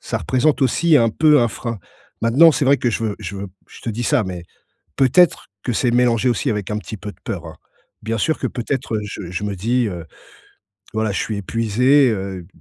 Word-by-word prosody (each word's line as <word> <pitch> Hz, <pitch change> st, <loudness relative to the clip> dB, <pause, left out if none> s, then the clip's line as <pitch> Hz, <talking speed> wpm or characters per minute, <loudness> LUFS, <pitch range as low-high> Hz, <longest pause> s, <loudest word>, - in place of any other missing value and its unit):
ça -, -, -3 dB
représente 135 Hz, +3 st, +1 dB
aussi 155 Hz, +5 st, +3 dB
un 115 Hz, -4 st, +3 dB
peu 150 Hz, +4 st, +4 dB
un 120 Hz, -, +2 dB
frein. 115 Hz, 0 st, -5 dB, 0.4 s
Maintenant, 135 Hz, +9 st, +6 dB
c'est 145 Hz, -, 0 dB
vrai 140 Hz, +1 st, +5 dB
que 120 Hz, -, 0 dB
je 115 Hz, -, -2 dB
veux 105 Hz, -2 st, -2 dB
je 100 Hz, -1 st, -6 dB
veux 100 Hz, -, -5 dB, 0.2 s
je -, -, -14 dB
te 115 Hz, -, -3 dB
dis 115 Hz, +3 st, -4 dB
ça, 110 Hz, -, +2 dB
mais 90 Hz, -2 st, -6 dB, 0.6 s
peut-être 145 Hz, +7 st, +3 dB, 0.2 s
que 125 Hz, -, -1 dB
c'est 120 Hz, +2 st, +1 dB
mélangé 120 Hz, 0 st, +2 dB
aussi 120 Hz, -, 0 dB
avec 105 Hz, -3 st, -3 dB
un 105 Hz, -, -1 dB
petit 105 Hz, 0 st, -7 dB
peu 105 Hz, -, -7 dB
de -, -, -23 dB
peur, 85 Hz, -4 st, -5 dB
hein. 80 Hz, -, -10 dB, 0.5 s
Bien 115 Hz, +1 st, -2 dB
sûr 155 Hz, +9 st, 0 dB
que -, -, -1 dB
peut-être, 120 Hz, -1 st, -3 dB
heu, 110 Hz, -, 0 dB
je 100 Hz, -3 st, -7 dB
je 95 Hz, +3 st, -4 dB
me 100 Hz, -1 st, -3 dB
dis 120 Hz, +5 st, 0 dB
heu,: 85 Hz, -4 st, -6 dB, 0.9 s
«Voilà, 110 Hz, -1 st, 0 dB
je -, -, -2 dB
suis 110 Hz, -, -3 dB
épuisé» 115 Hz, +7 st, +2 dB
heu, 95 Hz, -4 st, -4 dB
115 Hz, 225 wpm, -20 LUFS, 105-130 Hz, 0.9 s, Maintenant